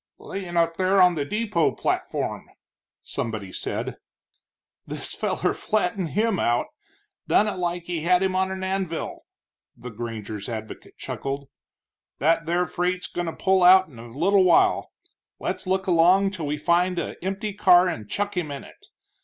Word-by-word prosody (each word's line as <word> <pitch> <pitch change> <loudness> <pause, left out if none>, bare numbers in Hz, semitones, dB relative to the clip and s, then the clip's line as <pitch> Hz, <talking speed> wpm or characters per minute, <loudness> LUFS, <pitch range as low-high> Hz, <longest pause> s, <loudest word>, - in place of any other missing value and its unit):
"Layin' 185 -3 -6
up 165 0 +2
there 190 +1 +3
on 180 -1 +6
the 145 -4 -2
depot 210 -1 0
platform," - - -2 0.5
somebody 105 -5 -4
said. - - -4 0.9
"This - - -6
feller - - -1
flattened 190 -4 -1
him 220 -3 +2
out, 120 +1 +1 0.6
done 215 - +4
it 210 - -3
like 175 -1 -2
he 170 -2 -3
had 180 +3 +3
him 190 -1 0
on 190 0 +1
a 190 0 -4
anvil," 190 -3 -3 0.5
the 125 - -8
granger's 110 -2 -6
advocate 110 -2 -7
chuckled. 140 0 -5 0.7
"That 165 +3 +2
there 175 +1 +1
freight's 180 +1 -2
goin' 175 -1 -4
to 165 - -3
pull 190 -1 +2
out 185 0 +7
in 120 -6 -14
a 120 - -9
little 185 - +3
while 180 -2 +3 0.5
let's - - -4
look 190 +1 0
along 185 +3 +4
till 170 -6 -5
we 150 +1 -1
find 175 +3 +2
a 170 - -4
empty 195 +2 -3
car 185 -2 +5
and 110 - -4
chuck 205 0 -2
him 175 -4 -2
in 140 -1 -6
it. - - -16
175 Hz, 160 wpm, -24 LUFS, 150-190 Hz, 0.9 s, out